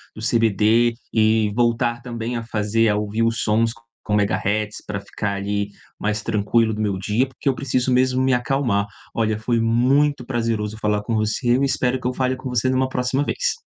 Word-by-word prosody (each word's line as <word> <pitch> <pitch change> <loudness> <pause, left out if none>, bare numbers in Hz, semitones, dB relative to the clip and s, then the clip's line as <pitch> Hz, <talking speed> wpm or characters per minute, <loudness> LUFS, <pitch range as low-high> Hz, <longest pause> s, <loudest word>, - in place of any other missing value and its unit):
do 110 - -9
CBD 115 +1 +3 0.2
e 110 -1 +3
voltar 120 0 +1
também 120 -1 -4
a 115 - -4
fazer 110 0 +1
a 105 - +2
ouvir 105 +2 -1
os 115 0 +1
sons 115 +1 +2 0.3
com 105 - -1
megahertz, 105 +1 0
para 100 -1 -3
ficar 100 0 -3
ali 100 +1 -2 0.3
mais 105 0 -1
tranquilo 110 +1 +1
do 105 - -5
meu 100 -3 0
dia, 105 +7 0
porque 135 +1 -3
eu - - +2
preciso 130 0 0
mesmo 130 +1 +2
me 130 -1 +3
acalmar. 125 -5 +1 0.3
Olha, 110 -2 0
foi 115 +1 0
muito 125 +4 +2
prazeroso 115 -4 -2
falar 105 -1 0
com 115 - -3
você. 110 +3 +1
Eu - - 0
espero 130 -1 +1
que 125 - -3
eu 125 - -1
fale 130 0 0
com 130 - -7
você 125 +1 0
numa 130 0 +2
próxima 130 +2 -1
vez. - - -1
115 Hz, 195 wpm, -22 LUFS, 105-125 Hz, 0.3 s, CBD